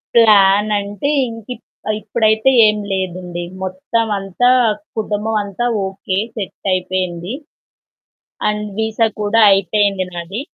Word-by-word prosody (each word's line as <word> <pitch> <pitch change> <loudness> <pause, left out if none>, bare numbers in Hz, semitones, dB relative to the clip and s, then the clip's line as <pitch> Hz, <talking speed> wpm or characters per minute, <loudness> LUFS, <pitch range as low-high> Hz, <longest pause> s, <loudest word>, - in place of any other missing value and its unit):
ప్లానంటే, 205 +1 +4 0.2
ఇంకిప్ 230 +2 -8 0.4
ఇప్పుడైతే 220 +2 +2 0.2
ఏం 210 0 +3
లేదండి. 180 -2 -3 0.2
మొత్తం 190 +5 -1
అంతా 195 +6 +1 0.5
కుటుంబం 215 +1 -2
అంతా 205 +5 -3 0.2
ఓకే. 190 0 -3 0.2
సెట్టాయిపోయింది. 185 -1 -3 1.2
అండ్ 210 0 -2
విసా 220 +1 +1 0.2
కూడా 220 +2 +2
అయిపోయింది 195 0 +2
నాది. 175 +6 -5
205 Hz, 90 wpm, -17 LUFS, 185-220 Hz, 1.2 s, ప్లానంటే